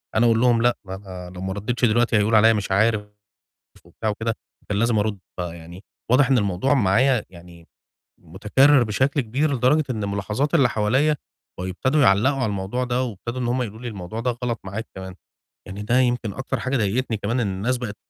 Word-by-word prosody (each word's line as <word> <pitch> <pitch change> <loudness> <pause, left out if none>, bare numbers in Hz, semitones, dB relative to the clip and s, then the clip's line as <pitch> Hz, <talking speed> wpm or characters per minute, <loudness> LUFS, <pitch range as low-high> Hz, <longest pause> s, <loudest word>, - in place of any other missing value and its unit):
أنا 110 - +4
أقول 115 -1 +3
لهم 120 -2 +3
لأ، 120 0 +2
أنا 95 -2 -8
لو 90 - -7
ما 95 0 -3
رديتش 120 +5 -1
دلوقتي 120 0 +2
هيقولوا 105 +1 +3
عليّا 115 +1 +6
مش 100 -2 -3
عارف 105 +1 +2 0.8
وبتاع 110 - -5
وكده، 115 +2 -2 0.3
كان 100 -1 -1
لازم 115 -1 +2
أرُد، 105 -1 -1 0.2
فيعني 85 +1 -7 0.3
واضح 135 +2 +4
إن 130 - +5
الموضوع 100 +6 +1
معايا 125 +2 +3
يعني 85 -1 -15 0.5
مُتكرر 115 - +3
بشكل 130 +6 0
كبير، 140 +5 0
لدرجة 130 +5 +2
إن 110 -4 -2
مُلاحظات 105 - -2
اللي 140 -7 +5
حواليَّ 130 +8 +1 0.4
بقوا 90 +1 -4
يبتدوا 130 +11 +1
يعلقوا 110 +7 +4
على 125 - 0
الموضوع 105 +4 -2
ده، 125 0 -1
وابتدوا 120 +1 -5
إن 125 - -1
هُم 125 +1 0
يقولوا 110 -1 -7
لي 125 - -4
الموضوع 105 0 -6
ده 125 +2 0
غلط 120 -3 -2
معاك 100 +4 -6
كمان، 95 -1 -8 0.5
يعني 100 +2 -7
ده 120 +4 +2
يمكن 120 -4 0
أكتر 135 +2 -4
حاجة 130 +2 -1
ضايقتني 115 +2 0
كمان 110 +5 -2
إن 110 - 0
الناس 100 +7 -1
بقت 115 -4 -6
115 Hz, 190 wpm, -23 LUFS, 100-125 Hz, 0.8 s, عليّا